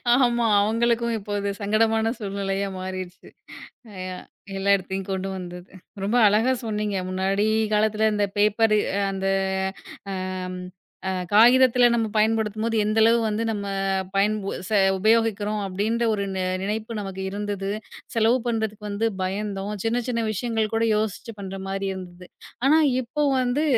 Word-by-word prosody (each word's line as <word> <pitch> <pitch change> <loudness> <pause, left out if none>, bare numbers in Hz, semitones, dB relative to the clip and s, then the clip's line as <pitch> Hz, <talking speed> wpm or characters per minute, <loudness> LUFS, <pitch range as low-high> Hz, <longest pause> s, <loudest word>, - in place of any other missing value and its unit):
ஆமா. 240 -2 +3 0.2
அவங்களுக்கும் 235 +2 +1
இப்போ 205 -1 -8
அது 200 0 -2
சங்கடமான 220 +2 +2
சூழ்நிலையா 200 -1 -2
மாறிருச்சு. 185 0 -7 0.8
யா 185 - -6 0.4
எல்லா 195 +1 0
இடத்தையும் 190 0 -5
கொண்டு 190 0 -2
வந்தது. 180 0 -8 0.3
ரொம்ப 210 +5 +1
அழகா 215 +5 +3
சொன்னீங்க. 210 -2 -2
முன்னாடி 195 +3 0 0.3
காலத்துல 215 +1 +2
அந்த 205 0 +1
பேப்பரு 215 +1 +3 0.2
அ - - +1
அந்த 195 0 -3 1.0
அ - - -4 0.8
அ - - +1 0.2
காகிதத்துல 245 +3 +6
நம்ம 230 -1 +1
பயன்படுத்தும்போது 220 +1 +1
எந்த 215 +1 0
அளவு 230 +1 +5
வந்து 215 +1 -1
நம்ம 205 -2 -3 0.5
பயன் 205 +2 +3 0.3
செ 215 - +3 0.2
உபயோகிக்கிறோம் 215 0 +2
அப்படின்ற 215 +5 -1
ஒரு 200 -1 -1
நெ 185 - -1 0.2
நினைப்பு 215 +3 -3
நமக்கு 195 -1 -6
இருந்தது. 200 -1 -3 0.5
செலவு 230 +2 +3
பண்றதுக்கு 220 -2 -2
வந்து 205 +3 0 0.2
பயந்தோம். 200 +1 -3
சின்ன 235 +2 +1
சின்ன 230 -2 0
விஷயங்கள் 220 +1 -1
கூட 225 - +1
யோசிச்சு 220 +2 -3
பண்ற 195 -1 -6
மாதிரி 195 0 -2
இருந்தது. 180 -1 -9 0.4
ஆனா 305 +3 +6 0.2
இப்போ 275 +5 -3 0.2
வந்து 255 +4 +1
210 Hz, 135 wpm, -24 LUFS, 195-225 Hz, 1.0 s, காகிதத்துல